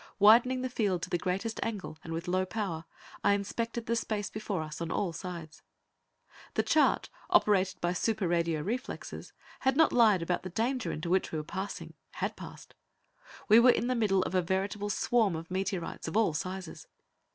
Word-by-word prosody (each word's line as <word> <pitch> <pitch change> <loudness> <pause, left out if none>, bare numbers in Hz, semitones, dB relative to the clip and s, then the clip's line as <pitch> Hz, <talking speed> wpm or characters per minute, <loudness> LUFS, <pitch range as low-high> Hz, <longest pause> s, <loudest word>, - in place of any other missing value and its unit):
Widening 240 +5 +6
the - - 0
field 200 -7 0
to - - -5
the 175 - +2
greatest 195 +6 -2
angle, 200 -8 -4
and 165 - -7
with 165 +2 -4
low 185 +1 +1
power, 185 -5 -3 0.4
I 200 - +5
inspected 230 +3 -2
the 235 - 0
space 210 -3 -2
before 210 -6 -3
us 155 +1 -7
on 165 - -2
all 180 -1 -1
sides. 170 -2 -7 0.9
The - - +2
charts, 310 - +3 0.2
operated 200 - +3
by 175 0 +1
super 205 0 0
radio 170 -2 +1
reflexes, 230 +10 -5 0.3
had 265 +1 +1
not 320 - +5
lied 215 -7 +5
about 180 +1 -1
the 185 - -6
danger 235 +6 -1
into 170 +3 -4
which 190 0 +2
we 160 - -2
were 155 - -3
passing 190 +6 -5 0.2
had - - -3
passed. - - -11 0.7
We 220 +2 +8
were 245 +2 +7
in 240 - +3
the 255 - +1
midst 205 -6 +2
of - - -4
a 185 - +3
veritable 195 +3 -2
swarm 215 -3 +2
of 165 +2 -7
meteorites 190 -2 -3
of - - -1
all 220 -8 +3
sizes. 185 +2 -5
195 Hz, 185 wpm, -30 LUFS, 175-225 Hz, 0.9 s, We